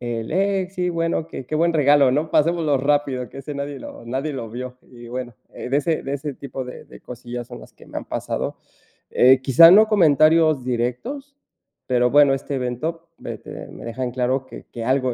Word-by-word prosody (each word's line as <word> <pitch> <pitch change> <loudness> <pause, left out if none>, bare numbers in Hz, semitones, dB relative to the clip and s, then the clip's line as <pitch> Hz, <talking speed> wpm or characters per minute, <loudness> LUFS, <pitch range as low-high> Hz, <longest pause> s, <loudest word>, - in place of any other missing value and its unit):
el 115 -2 -4
eh, 195 +1 +1
sí, 180 -2 -2
bueno: 165 -1 -1
"Qué 130 - -8
qué 155 - -4
buen 170 +2 +2
regalo, 145 -3 +4
¿no? 150 +5 -1
Pasémoslo 160 -2 +2
rápido, 140 -2 0
que - - -11
ese 145 +2 -7
nadie 140 0 -5
lo 115 - -10
nadie 135 +5 -3
lo 115 -5 -6
vio", 125 +2 -7
y 120 -2 -12
bueno, 125 0 -6 0.2
eh, - - -8
de 135 - +2
ese 160 +1 -1
de 135 - -5
ese 145 0 -5
tipo 135 -1 -7
de 125 - -10
de - - -14
cosillas 120 0 -8
son - - -10
las - - -15
que - - -18
me - - -9
han - - -10
pasado. - - -3 0.5
Eh, 130 +1 +5
quizá 140 +6 +8
no 210 +4 +7
comentarios 155 - +4
directos. 130 - -3 0.5
Pero 125 -1 +2
bueno, 145 0 +5
este 135 +1 -4
evento 155 +7 -4
me - - -7
te - - -10
me - - -11
deja 115 +2 -5
en 125 - -2
claro 130 +1 -1
que - - -12
que 115 - -5
algo 130 0 +1
135 Hz, 210 wpm, -22 LUFS, 125-160 Hz, 0.5 s, quizá